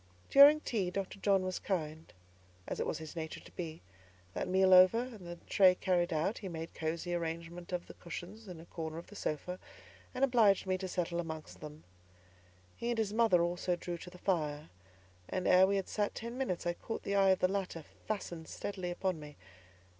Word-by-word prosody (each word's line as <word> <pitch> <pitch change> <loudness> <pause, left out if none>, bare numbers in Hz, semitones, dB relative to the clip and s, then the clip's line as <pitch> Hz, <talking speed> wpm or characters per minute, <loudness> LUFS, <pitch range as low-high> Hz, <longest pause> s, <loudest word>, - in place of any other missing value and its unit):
During 290 +2 +9
tea, 205 -10 -1
Dr. 195 +1 -4
John 195 -1 +3
was 185 -1 -2
kind, 160 -4 -3 0.6
as - - -4
it - - -1
was - - -1
his 160 0 -9
nature 160 -1 -5
to - - -15
be; 165 -2 -6 0.5
that - - -2
meal 190 0 +4
over, 185 +4 +8
and 230 -7 -5
the 175 - -6
tray 185 -2 +6
carried 180 -1 +1
out, 165 +7 0
he 195 - -6
made 165 -1 -5
a - - -14
cosy 165 +2 -2
arrangement 170 +1 -4
of 180 -1 -2
the - - -11
cushions 190 +6 -8
in 180 -3 -8
a 165 - -11
corner 160 -2 -5
of 170 - -7
the 205 - -14
sofa, 180 +2 -3 0.6
and 255 - 0
obliged 225 -8 +4
me 185 -1 +1
to 190 - -3
settle 175 -1 -2
amongst 160 -2 -6
them. 150 0 -10 0.9
He 235 - -3
and 240 - 0
his 215 -2 0
mother 215 -6 +4
also 175 +1 0
drew 175 0 -5
to 180 - -9
the 180 - -13
fire, 155 -5 -1 0.6
and 185 -1 -1
ere 185 +1 +7
we 200 - +1
had 195 -1 -1
sat 205 -1 -1
ten 235 +1 -5
minutes, 250 -11 -2
I 175 - +1
caught 225 - -6
the 200 - -2
eye 195 -1 +5
of 190 - +5
the 185 - +4
latter 185 -4 -3 0.2
fastened 175 -6 -4
steadily 185 -3 -4
upon 180 -1 -2
me. 150 -1 -10
180 Hz, 205 wpm, -33 LUFS, 170-200 Hz, 0.9 s, During